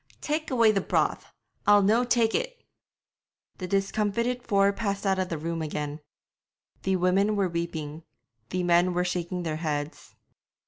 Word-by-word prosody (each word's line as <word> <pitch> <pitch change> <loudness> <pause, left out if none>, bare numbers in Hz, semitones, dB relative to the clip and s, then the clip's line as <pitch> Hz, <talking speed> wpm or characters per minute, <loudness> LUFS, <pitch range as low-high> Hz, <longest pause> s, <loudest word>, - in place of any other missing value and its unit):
'Tak' 305 +1 -2
away 230 -4 +4
the 200 -2 0
broth; - - 0 0.4
I'll 205 -1 +6
no' 220 +5 +4
tak' 235 -2 +2
it!' - - -3 1.0
The 185 - -4
discomfited 210 +5 0
four 200 -3 +2
passed 200 -2 -3
out 190 -1 +2
of 185 -1 -1
the 165 - -2
room 165 +1 -3
again. 150 -1 -4 0.8
The 190 0 +1
women 190 +4 +2
were 200 -2 +2
weeping; 165 -3 -4 0.5
the 180 0 -1
men 175 +1 +3
were 180 0 +1
shaking 180 0 -2
their 155 -2 -2
heads. 150 -2 -4
190 Hz, 150 wpm, -27 LUFS, 170-215 Hz, 1.0 s, I'll